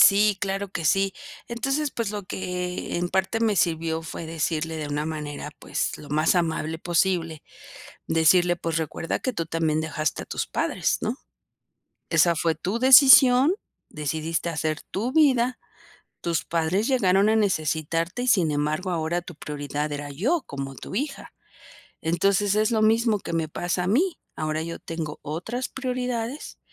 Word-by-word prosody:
sí 205 0 +6
claro 195 0 -2
que 170 - -5
sí. 195 +4 +2 0.4
Entonces, 270 +5 -1
pues, 230 -5 -3
lo 210 -1 -4
que 180 -1 -4
en 175 +1 -1
parte 190 +5 0
me 220 -3 +2
sirvió, 165 -1 0
fue 165 +1 -7
decirle, 160 0 -2
de 155 -1 -4
una 145 +1 -2
manera, 150 -2 -5
pues, - - -3
lo 145 - -11
más 155 +4 +3
amable 160 -2 -1
posible. 170 -2 0 0.6
Decirle: 175 +2 +4
"Pues, 165 -1 -2
recuerda 160 +1 -2
que 255 - -2
tú 165 -6 -3
también 160 -1 0
dejaste 155 -1 -2
a - - -12
tus - - -3
padres, - - 0
¿no? - - -1 0.9
Esa 165 +1 +4
fue 165 0 +1
tu 190 +8 -3
decisión, 265 +2 +8 0.4
decidiste 160 +2 -2
hacer 155 -1 -2
tu 230 +6 -3
vida, 255 -5 +3 0.6
tus 170 -2 -1
padres 170 +6 0
llegaron 200 -6 +3
a 220 - +3
necesitarte, 165 0 0
y - - -3
sin 185 -10 +4
embargo 150 +5 -1
ahora 170 0 -1
tu 175 -1 -11
prioridad 145 0 -4
era 145 0 -5
yo 240 - 0
como 135 -1 -5
tu 190 - -8
hija. 275 +4 -4 0.7
Entonces, 195 +4 +2
es 215 +1 +2
lo 220 -2 +2
mismo 220 -1 +3
que - - -6
me 165 -1 -1
pasa 175 +3 -2
a - - -2
mí. 320 - +1 0.2
Ahora 155 0 -2
yo 165 0 -5
tengo 160 -2 -5
otras 220 - -4
prioridades, 250 0 -4
175 Hz, 160 wpm, -25 LUFS, 160-215 Hz, 0.9 s, decisión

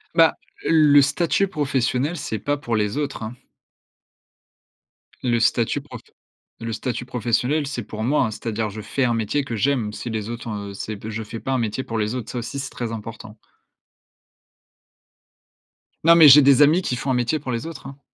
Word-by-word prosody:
Bah, 165 -2 +5 0.3
le 150 -3 +6
statut 170 +7 +1
professionnel, 145 -1 -1
c'est 110 -6 -4
pas 145 0 -1
pour 120 -5 -3
les 105 +4 -1
autres, 140 -5 -3
hein 110 +3 -6 1.9
le 120 -2 +1
statut 115 0 +1
profe - - -11 0.6
le 115 -1 -4
statut 120 +2 -4
professionnel, 125 +5 0
c'est 120 -5 -4
pour 110 0 -6
moi, 140 +2 +2
hein. 110 - -3
C'est-à-dire, 110 -1 -3
je 110 +2 -7
fais 130 +6 -1
un 120 - +1
métier 115 +6 -1
que 115 - -4
j'aime. 115 -3 0
Si 120 - -6
les 110 -1 -3
autres, 120 0 -6
heu, 100 -2 -5
c'est 105 +1 -6
p 110 - -8
je 110 0 -4
fais 115 +1 -7
pas 135 - -2
un - - +2
métier 115 +3 -2
pour 115 - -4
les 110 +3 -1
autres, 115 -3 -5
ça 125 - -3
aussi, 130 +4 -5
c'est 135 - -4
très 120 -2 -5
important. 110 0 -8 2.7
Non, 170 0 +8
mais 155 -3 +9
j'ai 145 +2 +10
des 140 +1 +5
amis 155 +6 +5
qui 125 - -2
font 130 +2 -2
un - - +2
métier 125 +5 0
pour 130 -3 -5
les 115 +6 -3
autres, 165 -4 -9
hein. 135 +1 -11
125 Hz, 195 wpm, -22 LUFS, 110-140 Hz, 2.7 s, j'ai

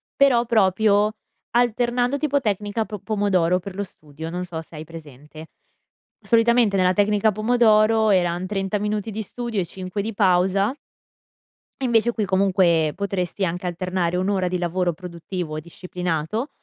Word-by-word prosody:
però 250 -4 +4
proprio 210 -1 +3 0.4
alternando, 245 +2 +1
tipo 285 -1 0
tecnica 210 0 -1
po 210 - -6
pomodoro 185 -5 +1
per 190 +1 -9
lo 200 - -2
studio, 155 -2 -10
non 180 +1 -3
so 165 -2 -6
se 160 - -16
hai 155 - -6
presente. 155 -1 -12 0.7
Solitamente 230 -2 +3
nella 185 -1 +3
tecnica 205 +2 +2
pomodoro 220 0 +3
eran 180 -1 +1
30 195 0 -2
minuti 210 +1 -2
di 220 +2 -4
studio 235 0 -4
e 180 - 0
5 185 +3 -5
di 220 +1 -5
pausa 195 +3 +2 1.1
invece 235 -2 +2
qui 220 -3 -2
comunque 185 -5 +2
potresti 195 -1 -2
anche 180 +2 -3
alternare 180 0 -1
un'ora 185 0 0
di 180 - -1
lavoro 175 0 -1
produttivo 170 -1 -6
disciplinato 180 - -4
195 Hz, 140 wpm, -22 LUFS, 180-220 Hz, 1.1 s, però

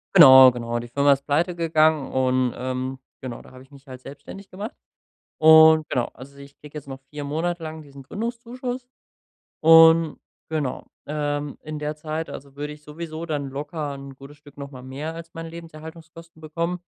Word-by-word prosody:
Genau, 130 -6 +10
genau, 120 -1 -4
die 120 0 -9
Firma 140 +2 +4
ist 140 0 -5
pleite 170 +5 0
gegangen 155 -3 +2
und, 130 -1 +1
ähm, 130 +1 -4 0.2
genau, 125 -3 -7
da - - -17
hab 130 0 -14
ich 135 +2 -19
mich 140 0 -17
halt 130 -1 -10
selbstständig 190 +8 -11
gemacht 205 +8 -7 0.6
und 160 0 +7
genau. 125 -3 -1
Also, 140 +2 -13
ich 140 0 -14
kriege 150 0 -14
jetzt 145 -2 -8
noch 135 0 -8
4 150 -1 -6
Monate 165 +4 -2
lang 155 -1 -7
diesen 140 -1 -13
Gründungszuschuss 240 - -6 0.7
und 165 0 +6 0.3
genau. 150 -5 -3 0.2
Ähm, 145 -1 -3
in 155 0 -6
der 150 0 -3
Zeit 155 +1 -5
also 140 0 -10
würde 150 +1 -5
ich 150 0 -14
sowieso 160 +2 -7
dann 145 -3 -3
locker 145 +1 -5
’n 140 0 -10
gutes 140 +2 -14
Stück 145 -1 -18
noch 140 0 -8
mal 125 -1 -10
mehr 145 +5 -6
als 165 0 -10
meine 165 0 -7
Lebenserhaltungskosten 165 0 -12
bekommen, 170 +3 -3
150 Hz, 180 wpm, -23 LUFS, 135-165 Hz, 0.7 s, Genau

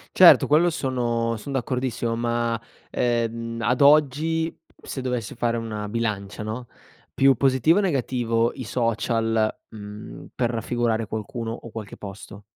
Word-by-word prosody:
Certo, - - +8
quello 160 +4 +4
sono 120 -6 -1
son 135 +6 -7
d'accordissimo 125 -2 -1
ma, 120 -1 0 0.3
ehm, 115 -1 -1
ad 125 +3 +1
oggi, 155 +3 +4 0.3
se 135 - -5
dovessi 125 -4 -3
fare 120 -1 0
una 110 -2 -4
bilancia, 105 -2 -3
no, 115 +3 -5 0.5
più 135 0 +5
positivo 135 - +3
o - - +4
negativo 120 - +1
i 130 - -7
social, 115 -1 +1 0.2
mhmm, 105 0 -9
per 120 -2 +1
raffigurare 115 -1 -1
qualcuno 115 +2 -4
o 115 - -9
qualche 110 -3 -7
posto? 100 0 -10
115 Hz, 135 wpm, -24 LUFS, 115-130 Hz, 0.5 s, Certo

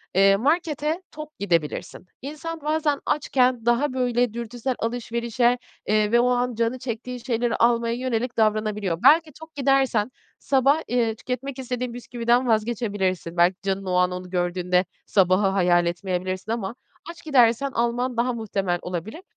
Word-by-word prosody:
eee, 195 0 +6
markete 310 - 0
tok 305 0 -10
gidebilirsin. 170 -2 -2 0.2
İnsan 310 +3 -6
bazen 300 -1 0
açken 255 -5 +1
daha, 255 +3 +2
böyle, 245 -2 +1
dürtüsel 235 +2 -4
alışverişe, 235 +1 0 0.3
eee, 215 0 +2
ve 235 - +5
o 245 +1 +3
an 245 -1 0
canı 230 +2 -1
çektiği 250 0 -5
şeyleri 240 -2 0
almaya 235 0 +2
yönelik 245 -1 -2
davranabiliyor. 215 -4 +1
Belki 310 +3 +6
tok 320 -1 -13
gidersen 270 -5 +2 0.3
sabah, 275 +3 +2
eee, 235 -2 0
tüketmek 260 +3 -5
istediğin 250 -1 -4
bisküviden 240 +1 0
vazgeçebilirsin. 205 -6 -1
Belki 180 +2 +4
canın 195 0 -2
o 185 - -2
an 180 0 +3
onu 180 0 -6
gördüğünde 180 0 0 0.2
sabahı 190 0 +3
hayal 180 -3 +3
etmeyebilirsin 185 +3 -3
ama 225 -1 -3 0.4
aç 345 - -15
gidersen 265 -2 +3
alman 240 +1 -1
daha 245 +1 +1
muhtemel 195 -6 -2
olabilir. 180 - -6
235 Hz, 145 wpm, -24 LUFS, 195-255 Hz, 0.4 s, eee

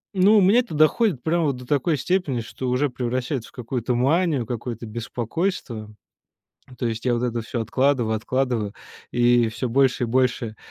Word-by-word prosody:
ну, 195 +3 +5
у 205 - +6
меня 200 +6 +5
это 240 -9 -3
доходит 155 - +3
прямо 165 0 +1
вот 140 -3 0
до 125 - -10
такой 145 +2 +1
степени, 140 -5 0
что 125 +3 -6
уже 130 +3 +1
превращается 125 0 -3
в - - -25
какую-то 125 0 -3
манию, 145 0 +2
какое-то 120 -1 -5
беспокойство. 115 - -3 0.9
То 120 - 0
есть 115 +1 -4
я 125 - +2
вот 120 - -2
это 120 -1 -1
всё 115 +1 -4
откладываю, 120 0 +1
откладываю 115 -2 -1 0.4
и 120 -1 +3
всё 120 +2 -3
больше 130 0 +2
и - - -7
больше, 120 -2 0
125 Hz, 175 wpm, -23 LUFS, 115-145 Hz, 0.9 s, у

